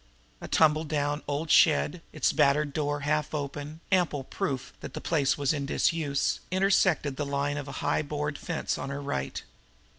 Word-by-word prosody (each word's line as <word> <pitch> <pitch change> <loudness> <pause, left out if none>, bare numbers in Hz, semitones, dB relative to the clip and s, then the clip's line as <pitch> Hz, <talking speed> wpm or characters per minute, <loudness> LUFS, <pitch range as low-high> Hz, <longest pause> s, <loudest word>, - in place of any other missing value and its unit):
A - - -6
tumble 155 0 +4
down 145 -1 -1
old 145 +2 -2
shed, 165 +2 +4
its 155 - +1
battered 145 +1 +3
door 145 -1 -1
half 150 +1 0
open, 145 +2 -5
ample 175 -7 +2
proof 130 0 -3
that - - -8
the - - -3
place 140 -4 +1
was 145 +1 +1
in 140 -2 -3
disuse, 145 -2 +1
intersected 185 -7 +2
the 150 - -1
line 140 +1 -1
of 145 -1 -5
high 140 - -1
board 150 0 -3
fence 165 -3 -2
on - - -4
her 140 0 -4
right. 70 - -3
145 Hz, 170 wpm, -28 LUFS, 140-155 Hz, -, tumble